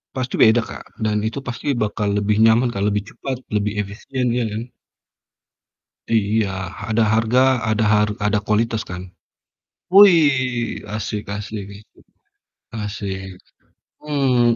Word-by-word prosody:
Pasti 130 -1 -2
beda 115 +1 +6
Kak, - - -11
dan 105 -1 +1
itu 110 +4 -3
pasti 120 -2 -6
bakal 105 -2 -1
lebih 105 +1 +1
nyaman 115 +2 +4
Kak, 100 - -3
lebih 105 0 0
cepat, 135 -2 -4 0.2
lebih 105 0 0
efisien, 120 +6 -4
iya 120 -1 0
kan? 110 +4 -5 1.4
Iya, 110 -1 +1 0.4
ada 110 +1 +2
harga, 120 +4 +3
ada 110 0 +1
har 105 0 +3 0.2
ada 105 0 +2
kualitas 110 +1 +1
kan? 90 0 -6 0.9
Wih 140 - +4
asik 105 0 -4
asik 105 -1 -6
asik, 100 +1 -16 0.7
asik, 100 -2 -4 0.8
mmm, 130 -5 +2
110 Hz, 125 wpm, -21 LUFS, 105-125 Hz, 1.4 s, beda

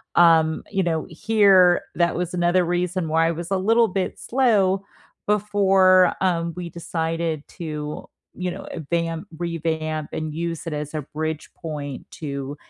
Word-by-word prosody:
Um, 165 -2 +5
you 195 - +1
know, 160 -2 -1
here, 190 -1 +4
that 170 -1 +2
was 180 0 -3
another 175 +1 +2
reason 175 0 -1
why 165 +1 +3
I - - +1
was 170 +2 -6
a 195 - +2
little 225 +4 +3
bit 185 0 -2
slow 205 -7 +2 0.4
before, 195 -3 +4
um, 170 -2 0
we 180 -1 -5
decided 165 -2 -3
to, 150 -3 -6 0.3
you 180 0 -3
know, - - -8 0.3
vamp, 165 +1 -1
revamp, 160 -2 -2
and 155 -1 -3
use 165 0 -4
it 160 - -3
as 150 0 -4
a 155 - -1
bridge 155 0 -3
point 145 -4 -6
to 140 -2 -5
170 Hz, 150 wpm, -23 LUFS, 160-185 Hz, 0.4 s, Um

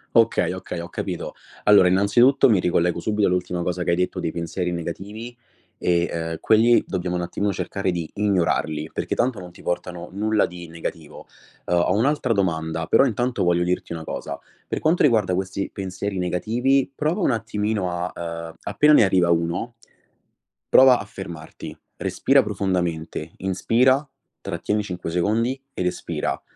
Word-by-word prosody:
Okay, 115 -5 +3
okay, 90 -2 -6
ho 85 0 -6
capito. - - -5 0.3
Allora, 100 -3 +7
innanzitutto 105 +9 +4
mi 105 -5 +4
ricollego 85 -1 +1
subito 105 +2 +1
all'ultima 90 -1 -1
cosa 90 0 -2
che - - 0
hai 85 - +3
detto 90 +1 -1
dei 80 - -2
pensieri 90 +1 -3
negativi, 100 +8 -6 0.4
e, 85 -1 +1
ehm, 80 -1 -3
quelli 115 +2 +4
dobbiamo 90 -1 -2
un 90 - -1
attimino 100 +3 -2
cercare 95 +1 -2
di 85 -3 -4
ignorarli, 85 -6 0
perché - - -3
tanto 120 -3 0
non 90 -1 -9
ti - - -16
portano 90 0 -4
nulla 105 +2 +1
di 85 -1 -9
negativo. 80 -1 -7 0.4
Uhm, 90 - +1
ho 85 - +2
un'altra 130 +1 +1
domanda, 80 -4 -1
però 135 - +5
intanto 120 -1 0
voglio 85 0 +2
dirti 90 -1 -2
una 80 - -6
cosa: - - -5 0.3
per - - -2
quanto 160 +3 +2
riguarda 110 -9 +3
questi 95 +1 -3
pensieri 95 +1 -4
negativi, 120 +10 +1
prova 155 +8 -1
un 135 - +3
attimino 105 -4 -1
a, 85 +1 -3 0.4
ehm, 80 - -10
appena 150 0 +4
ne - - +7
arriva 90 -3 +3
uno, 85 +8 0 0.9
prova 130 -1 +7
a - - -6
fermarti, 85 -6 -9 0.2
respira - - +3
profondamente, 85 -4 -2
inspira, 120 +9 +2 0.4
trattieni 105 0 -2
5 90 -3 -5
secondi 115 +9 0
ed 90 - -3
espira, 90 0 -2
95 Hz, 160 wpm, -23 LUFS, 85-110 Hz, 0.9 s, Allora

